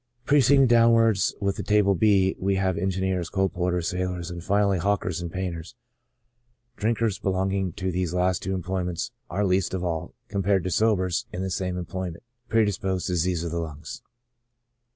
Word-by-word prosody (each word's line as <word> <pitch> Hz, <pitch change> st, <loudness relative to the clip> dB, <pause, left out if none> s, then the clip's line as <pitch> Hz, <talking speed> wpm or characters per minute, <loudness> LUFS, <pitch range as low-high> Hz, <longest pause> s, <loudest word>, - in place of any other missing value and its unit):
Proceeding 140 Hz, -1 st, +5 dB
downwards 115 Hz, -4 st, +4 dB
with 100 Hz, -1 st, -1 dB
the -, -, -3 dB
Table 105 Hz, -2 st, +3 dB
B, 95 Hz, 0 st, +3 dB
we 95 Hz, +1 st, +1 dB
have 95 Hz, -1 st, +1 dB
engineers, 95 Hz, -1 st, -1 dB
coal 95 Hz, -1 st, +1 dB
porters, 90 Hz, 0 st, -1 dB
sailors, 90 Hz, -1 st, -3 dB
and 85 Hz, -1 st, -7 dB
finally 100 Hz, -1 st, +2 dB
hawkers 90 Hz, -3 st, -1 dB
and 85 Hz, -1 st, -5 dB
painters; 90 Hz, +2 st, -5 dB, 1.0 s
drinkers 110 Hz, -2 st, 0 dB
belonging 95 Hz, 0 st, 0 dB
to 95 Hz, +1 st, -3 dB
these 90 Hz, -1 st, -1 dB
last 90 Hz, 0 st, +1 dB
two 95 Hz, +1 st, -2 dB
employments 90 Hz, -1 st, -3 dB, 0.2 s
are 100 Hz, +5 st, 0 dB
least 95 Hz, 0 st, +1 dB
of 90 Hz, -, -3 dB
all, 85 Hz, -2 st, -3 dB
compared 100 Hz, -2 st, +1 dB
to 90 Hz, -, -2 dB
sobers 95 Hz, -4 st, +1 dB
in 90 Hz, -, -4 dB
the 95 Hz, -, -3 dB
same 90 Hz, 0 st, -2 dB
employment, 90 Hz, -1 st, -5 dB, 0.3 s
predisposed 95 Hz, -4 st, +1 dB
to 90 Hz, -, -2 dB
diseases 85 Hz, 0 st, 0 dB
of 85 Hz, -, -4 dB
the 85 Hz, -, -2 dB
lungs. 80 Hz, -1 st, -7 dB
95 Hz, 165 wpm, -25 LUFS, 90-100 Hz, 1.0 s, Proceeding